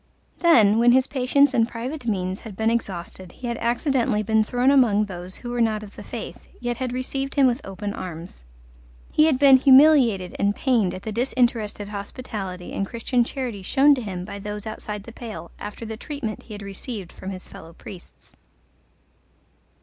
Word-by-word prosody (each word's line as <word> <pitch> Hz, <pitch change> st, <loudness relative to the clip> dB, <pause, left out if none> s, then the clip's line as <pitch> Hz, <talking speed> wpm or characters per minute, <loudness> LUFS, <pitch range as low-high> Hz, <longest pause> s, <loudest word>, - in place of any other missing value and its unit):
Then, 225 Hz, -, +5 dB
when 240 Hz, +1 st, +6 dB
his 260 Hz, 0 st, +4 dB
patience 275 Hz, +1 st, +2 dB
and 230 Hz, -3 st, +3 dB
private 245 Hz, +3 st, -6 dB
means 185 Hz, -3 st, -1 dB
had 220 Hz, -4 st, -10 dB
been 220 Hz, +1 st, +2 dB
exhausted, 185 Hz, -5 st, -4 dB
he 255 Hz, -, -10 dB
had 235 Hz, -1 st, -2 dB
accidently 235 Hz, -2 st, +1 dB
been 220 Hz, +1 st, +3 dB
thrown 245 Hz, +4 st, +2 dB
among 225 Hz, -7 st, +4 dB
those 180 Hz, -1 st, -6 dB
who 240 Hz, -, -6 dB
were 240 Hz, 0 st, -1 dB
not 215 Hz, -2 st, +1 dB
of 205 Hz, -, -12 dB
the -, -, -9 dB
Faith, -, -, -8 dB
yet 240 Hz, -1 st, -3 dB
had 255 Hz, -1 st, -3 dB
received 270 Hz, +2 st, -3 dB
him 280 Hz, -2 st, +5 dB
with 250 Hz, +2 st, +1 dB
open 200 Hz, +1 st, -5 dB
arms. 170 Hz, -, -8 dB, 0.7 s
He 305 Hz, -, +4 dB
had 300 Hz, -5 st, +2 dB
been 275 Hz, -1 st, +7 dB
humiliated 260 Hz, -, +5 dB
and 200 Hz, 0 st, +2 dB
pained 230 Hz, -10 st, +1 dB
at 185 Hz, -, -9 dB
the 220 Hz, -, -4 dB
disinterested 230 Hz, -3 st, 0 dB
hospitality 200 Hz, -3 st, -6 dB
and 195 Hz, -, -2 dB
Christian 240 Hz, +2 st, 0 dB
charity 245 Hz, -5 st, -5 dB
shown 275 Hz, +9 st, +4 dB
to 265 Hz, -, -1 dB
him 185 Hz, -5 st, -5 dB
by 200 Hz, 0 st, -7 dB
those 210 Hz, +1 st, -6 dB
outside 210 Hz, -1 st, -6 dB
the 230 Hz, -, -10 dB
pale, 215 Hz, -8 st, -8 dB
after 210 Hz, +2 st, -7 dB
the 220 Hz, 0 st, -6 dB
treatment 250 Hz, -5 st, -5 dB
he 215 Hz, -, -10 dB
had 205 Hz, -, -9 dB
received 200 Hz, -1 st, -7 dB
from 190 Hz, -, -8 dB
his 185 Hz, -1 st, -8 dB
fellow 165 Hz, -, -12 dB
priests. 180 Hz, +1 st, -13 dB
225 Hz, 185 wpm, -23 LUFS, 200-255 Hz, 0.7 s, been